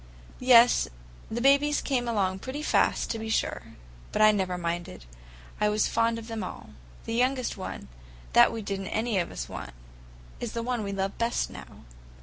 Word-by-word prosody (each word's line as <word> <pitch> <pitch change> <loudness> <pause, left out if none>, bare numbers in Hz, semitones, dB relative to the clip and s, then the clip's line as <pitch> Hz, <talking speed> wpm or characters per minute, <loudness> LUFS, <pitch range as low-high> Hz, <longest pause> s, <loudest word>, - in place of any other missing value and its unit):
"Yes, 245 -1 +6 0.4
the 235 +2 -3
babies 280 +3 +4
came 250 -3 -1
along 190 -5 0
pretty 270 +7 -5
fast, - - +2
to 225 - -3
be 220 0 -5
sure. 220 - 0 0.5
But - - +2
I 215 - +8
never 190 -3 -1
minded. 170 - -4 0.5
I 210 - +3
was 210 0 +2
fond 230 0 +1
of 230 0 -8
them 225 -3 -4
all. 185 - -8 0.3
The 225 - -3
youngest 255 +1 +1
one, 185 - -7 0.5
that - - +7
we 225 -1 -5
did 200 -1 -3
n't 190 - -6
any 220 -2 0
of 175 - -2
us - - -6
want, 65 - -8 0.6
is 235 - -4
the 230 - -3
one 245 -1 -1
we 200 -1 -3
love 195 0 -3
best 235 +1 0
now." - - -12
225 Hz, 185 wpm, -27 LUFS, 195-240 Hz, 0.6 s, I